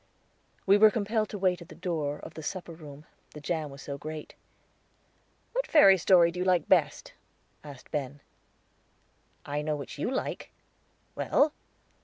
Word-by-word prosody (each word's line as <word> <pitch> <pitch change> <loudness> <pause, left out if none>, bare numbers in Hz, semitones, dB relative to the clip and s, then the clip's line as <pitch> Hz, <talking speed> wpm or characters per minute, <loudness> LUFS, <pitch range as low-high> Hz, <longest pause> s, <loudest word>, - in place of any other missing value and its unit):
We 200 +1 +5
were 215 0 +8
compelled 215 0 -1
to 210 - -5
wait 185 -2 +1
at 170 - -12
the - - -11
door 150 -5 -2
of - - -11
the 160 - -8
supper 175 +3 -5
room, 150 -2 -12 0.3
the - - -7
jam 155 0 -3
was 140 0 -11
so 140 -1 -6
great. 155 +1 -7 1.2
"What - - -1
fairy 195 -12 +7
story 170 -1 +5
do 180 - -7
you - - +1
like 180 -3 +2
best?" - - +1 0.5
asked 145 -4 -12
Ben 145 -2 -4 1.3
"I 145 +1 -2
know 150 0 -1
which 145 0 -8
you - - -1
like." 260 - -3 0.6
"Well?" 295 +1 +2
165 Hz, 160 wpm, -28 LUFS, 150-195 Hz, 1.3 s, were